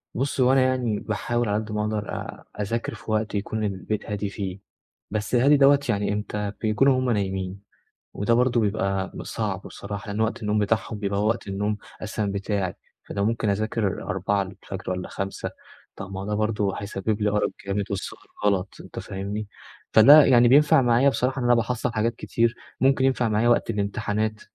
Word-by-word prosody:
بُصّ 135 +2 -1
هو 125 0 +5
أنا 135 - +5
يعني 125 -5 +1
باحاول 120 +2 -1
على 105 +1 0
قد 110 - -9
ما 105 0 -1
أقدر 105 -1 -2
أ - - -6 0.2
أذاكر 115 +3 -2
في - - -7
وقت 110 0 0
يكون 110 +2 -2
البيت 105 +1 -3
هادي 105 -1 -2
فيه، 100 -2 -5 0.5
بس 110 +3 -1
هادي 140 +4 +5
دوّة 140 0 +6
يعني 105 -2 +1
إمتى 105 0 -3
بيكون 110 +4 +2
وهُم 130 -1 +3
نايمين، 95 -2 -2 0.6
وده 105 +4 +1
برضه 120 0 +3
بيبقى 100 -3 -1
صعب - - -3
بصراحة 100 +2 -7
لأن 105 +1 -3
وقت 110 +1 0
النوم 105 0 +1
بتاعهم 105 +1 0
بيبقى 100 -1 -1
هو 105 - +2
وقت 115 -2 -2
النوم 105 +2 -1 0.3
أساسًا 110 0 -2
بتاعي، 100 -1 -2 0.3
فأنا 100 - -3
ممكن 110 +1 0
أذاكر 105 0 -1
04:00 95 0 -3
والّا 90 0 -3
05:00 95 0 -4 0.5
طَب 95 0 -7
ما 95 - -4
هو 95 - -5
ده 105 - -1
برضه 105 -2 0
هيسبب 100 +1 -3
لي 105 - +2
أرق 105 0 +1 0.2
جامد 100 +1 -1
والسهر 100 - -5 0.2
غلط 100 -1 +1
أنت - - -9
فاهمني، 100 +2 -5 0.4
فده 145 +7 +9
يعني 120 -2 +6
بينفع 145 +1 +6
معايا 120 +2 +4
بصراحة 130 0 0
إن 125 - -2
أنا 120 - +6
باحصّل 120 +1 -1
حاجات 115 +1 0
كتير 115 0 0 0.3
ممكن 135 0 +3
ينفع 130 -3 +2
معايا 110 +2 +2
وقت 120 -1 +3
الإمتحانات 105 +1 -1
105 Hz, 180 wpm, -25 LUFS, 100-120 Hz, 0.6 s, فده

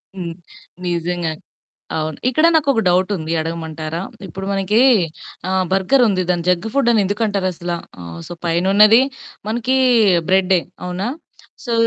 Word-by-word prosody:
హ్మ్. 175 -3 -5 0.5
నిజంగానే. 170 -2 -2 0.6
అవును. 155 -1 -3
ఇక్కడ 310 +6 +2
నాకొక 280 -7 +2
డౌటుంది. 180 -2 0
అడగమంటారా? 160 0 -4 0.3
ఇప్పుడు 195 0 -7
మనకి 195 +3 +1 0.7
ఆహ్, 190 0 +1
బర్గరుంది. 195 0 +3
దాన్ని 175 -1 0
జంక్ 180 +4 +1
ఫుడ్డని 235 -6 +3
ఎందుకంటారసల? 190 -4 -2 0.3
ఆహ్, 85 -1 -8
సో, - - -6
పైనున్నది 195 +7 +5 0.5
మనకి 240 +4 0 0.5
బ్రెడ్డే 190 -1 +3 0.3
అవునా? 180 +4 -3 0.6
సో 240 - -2
185 Hz, 110 wpm, -19 LUFS, 170-215 Hz, 0.7 s, పైనున్నది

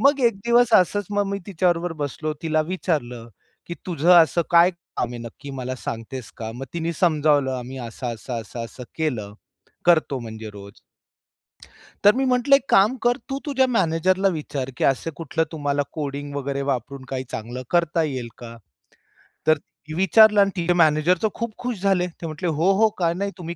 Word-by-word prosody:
मग 280 0 +4
एक 230 - +2
दिवस 240 0 +4
असंच 195 +2 +3
मग 205 -1 +1
मी 200 - -2
तिच्याबरोबर 175 -2 0
बसलो. 155 +2 -4
तिला 155 -1 +1
विचारलं 125 -11 -2 0.4
की 170 - -5
"तुझं 170 -1 +1
असं 170 +1 +1
काय 170 +2 +6
काम 170 -8 -5
आहे 120 - -6
नक्की 120 +5 -9
मला 130 0 -3
सांगतेस 115 +2 -6
का?" 110 -2 -5
मग 135 +2 -7
तिने 170 0 -2
समजावलं 150 -5 +3
"आम्ही 130 +2 -7
असं-असं, 120 0 -5
असं-असं 115 +3 -8
केलं, 120 -11 -2 0.5
करतो 155 -5 +3
म्हणजे 110 -1 -8
रोज." 100 0 -12 1.2
तर 205 - +7
मी 270 - +1
म्हटलं 255 +2 +4
"एक 275 -1 -2
काम 210 +7 +5
कर. 240 0 +3
तू 270 - -2
तुझ्या 265 -3 +2
मॅनेजरला 185 -2 +2
विचार, 140 -3 -4
की - - -1
असं 135 +4 +1
कुठलं 160 0 -1
तुम्हाला 145 -2 -1
कोडिंग 145 -1 -4
वगैरे 140 0 -2
वापरून 130 +2 -4
काही 130 -1 -3
चांगलं 120 +3 -5
करता 170 -1 +2
येईल 130 -6 -3
का?" 115 -1 -10 0.9
तर 155 - +5 0.4
विचारलं 205 +3 +6
आणि 195 0 +3
तिचे 175 0 +1
मॅनेजर 160 +1 +3
तर - - +5
खूप 235 -2 -4
खुश 245 -6 -4
झाले. 190 -3 +2
ते 170 -1 -10
म्हंटले 160 +3 -4
"हो. 165 +5 +2
हो. 220 0 +5
का 170 -2 +2
नाही? 200 +2 -3
तुम्ही 170 -1 -6
160 Hz, 175 wpm, -23 LUFS, 130-190 Hz, 1.2 s, तर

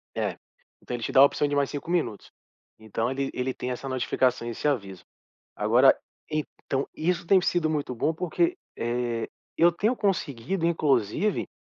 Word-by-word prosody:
É. - - -1 0.5
Então 125 - -4
ele 120 - -6
te - - -2
dá - - +5
a - - +11
opção 145 +1 +1
de 145 - -1
mais 140 -1 +2
5 145 +2 -6
minutos. 160 - -1 0.5
Então, 110 +2 -2
ele 135 0 -2
ele 130 +1 -2
tem 125 - -4
essa 135 +2 -5
notificação 130 -1 +1
e - - -2
esse 115 - -2
aviso. 100 -10 -2 0.5
Agora 120 +6 +5 0.3
então, 145 -2 -2
isso 170 +2 -1
tem 190 +1 +6
sido 175 -3 +1
muito 145 -4 -2
bom 155 +7 0
porque, 340 - 0 0.2
eh, 120 -1 -1 0.3
eu 170 +1 +6
tenho 215 +8 +1
conseguido 170 - -1
inclusive, 155 - +1
140 Hz, 170 wpm, -26 LUFS, 120-165 Hz, 0.5 s, a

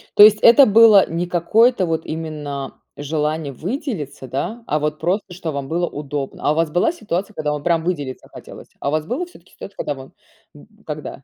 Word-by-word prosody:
То 205 - +9
есть 215 0 +7
это 260 +4 +8
было 215 -2 +6
не 170 +2 -2
какое-то 205 +5 +3
вот 160 -1 -2
именно 150 -4 -5 0.2
желание 150 0 -2
выделиться, 170 - -5
да, 180 - -4
а 150 - 0
вот 150 0 -2
просто, 180 +3 -2
что 170 -3 -5
вам 140 -1 -5
было 175 +1 0
удобно? 145 -1 -6
А 145 - +3
у - - 0
вас 165 0 +1
была 175 - +2
ситуация, 210 - -4
когда 150 -4 -2
вам 150 - -5
прям 170 -1 +1
выделиться 145 -7 -4
хотелось? - - -12
А - - -1
у - - -2
вас 155 0 -1
было 255 - -3
всё-таки 185 - -19
ситуация, 195 - -11
когда 145 - -2
мы 135 0 -12 0.4
б 150 - -16 0.2
когда? 150 -3 -7
160 Hz, 205 wpm, -20 LUFS, 150-200 Hz, 0.4 s, То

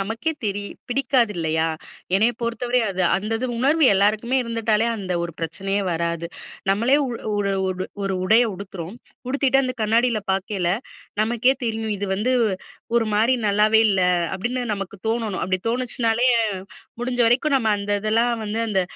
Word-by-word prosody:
நமக்கே 225 +11 -2
தெரி 205 0 -2 0.3
பிடிக்காது 245 -4 +2
இல்லையா, 160 0 0 0.5
என்னைய 220 +4 +3
பொறுத்தவரை 240 +1 0
அது, 185 -1 -1
அந்த 210 +4 -3
இது 255 - -1
உணர்வு 290 +4 +3
எல்லாருக்குமே 215 +6 +2
இருந்துட்டாலே 230 -1 +1
அந்த 185 -3 -4
ஒரு 170 -2 -7
பிரச்சனையே 195 +5 -2
வராது. 170 0 -2 0.4
நம்மளே 235 +8 +3 0.4
ஒரு 200 -1 0 0.2
ஓ - - +1 0.5
உடைய 225 +5 +5
உடுத்துறோம். 190 +1 -7 0.3
உடுத்திட்டு 270 0 +2
அந்த 255 0 -2
கண்ணாடில 230 +1 +2
பாக்கயில 190 -2 -1 0.5
நமக்கே 240 +4 +2
தெரியும். 220 -2 -2
இது 200 - -2
வந்து 245 +6 0 0.6
ஒரு 230 - +3
மாரி 230 +5 +4
நல்லாவே 215 +2 +4
இல்ல, 190 -2 +2 0.3
அப்படின்னு 240 +7 -2
நமக்கு 195 0 -6
தோணனும். 225 -4 -1
அப்படி 185 0 0
தோணுச்சுனாலே 240 0 +1 0.7
முடிஞ்ச 245 0 -2
வரைக்கும் 270 +5 +2
நம்ம 225 -3 0
அந்த 200 0 -2
இதெல்லாம் 230 +3 +2
வந்து 215 +2 -2
அந்த 195 -3 +2
220 Hz, 140 wpm, -22 LUFS, 195-245 Hz, 0.7 s, உடைய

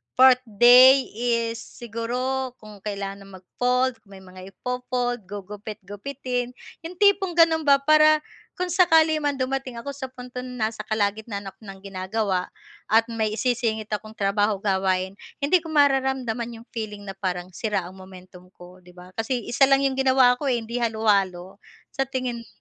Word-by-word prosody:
4th 260 +1 +8 0.2
day 250 +5 +7
is 230 0 -1
siguro 245 +3 -4
kung 210 -3 -14
kailangan 200 -1 -6
mag-fold, 250 +6 -1
kung 200 -1 -16
may 190 - -13
mga 185 0 -12
i-fold 250 -3 -3
gugupit-gupitin 210 +5 -6 0.3
yung 360 - -11
tipong 390 -2 +3
ganun 320 -2 +4
ba 275 0 +5
para 310 0 +5 0.3
kung 360 -1 -3
sakali 320 -3 +4
man 290 -1 -1
dumating 260 -1 -3
ako 260 +5 -6
sa 270 -1 -6
puntong 250 -1 -9
ng 250 - -8
nasa 215 -1 -3
kalagitnaan 205 -1 -2
ako - - -38
ng 195 0 -9
ginagawa 190 0 -2 0.4
at 225 +1 +4
may 220 -1 -1
isisingit 225 -3 -1
akong 215 +1 -5
trabaho 205 +1 +1
gawain, 190 -1 0 0.2
hindi 355 +5 +4
ko 330 - -11
mararamdaman 265 -5 +1
yung - - -36
feeling 210 -3 -6
na 195 - -6
parang 185 -2 -4
sira 205 0 -2
ang 185 +2 -11
momentum 185 -1 -14
ko 180 +1 -14
di 180 0 -19
ba 180 +1 -13
kasi 240 0 -1
isa 265 +2 +4
lang 275 0 +3
yung 270 -1 0
ginawa 260 -2 +4
ko 285 - -3
eh, 250 - +2
hindi 235 +2 -4
halo-halo 200 -5 0 0.3
sa 270 -1 -2
tingin 255 -3 -3
mo? 230 - -13
230 Hz, 160 wpm, -24 LUFS, 200-260 Hz, 0.4 s, 4th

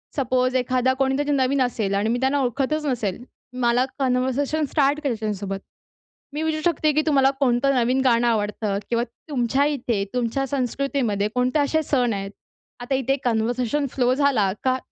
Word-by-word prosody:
Suppose 255 -1 +1
एखादा 255 0 +1
कोणीतरी 270 +2 +1
नवीन 275 0 +2
असेल 225 -5 0
आणि 205 +2 0
मी 240 +2 0
त्यांना 265 +2 +1
ओळखतच 275 +4 -1
नसेल. 240 -6 -2 0.4
मला 240 +1 +3
कन्व्हर्सेशन 265 +4 0
स्टार्ट 290 -1 +2
करायच्या 220 -6 -1
सोबत, 195 0 -5 0.7
मी 300 - -3
विचारू 315 -1 -1
शकते, 310 -2 +2
"की 305 - +3
तुम्हाला 275 -4 +4
कोणतं 270 0 +2
नवीन 250 +2 +2
गाणं 240 -1 +3
आवडतं? 210 -2 -1
किंवा 235 0 +1 0.3
तुमच्या 265 0 +1
इथे 245 -8 -1
तुमच्या 250 +2 -1
संस्कृतीमध्ये 255 -5 -1
कोणते 250 +4 +1
असे 295 +2 +1
सण 250 -5 +1
आहेत?" 195 0 -4 0.5
आता 245 +3 -1
इथे 270 +1 +1
कन्व्हर्शन 245 +4 0
फ्लो 250 -1 +2
झाला 260 -8 +2
का 260 0 +2
255 Hz, 155 wpm, -23 LUFS, 235-275 Hz, 0.7 s, तुम्हाला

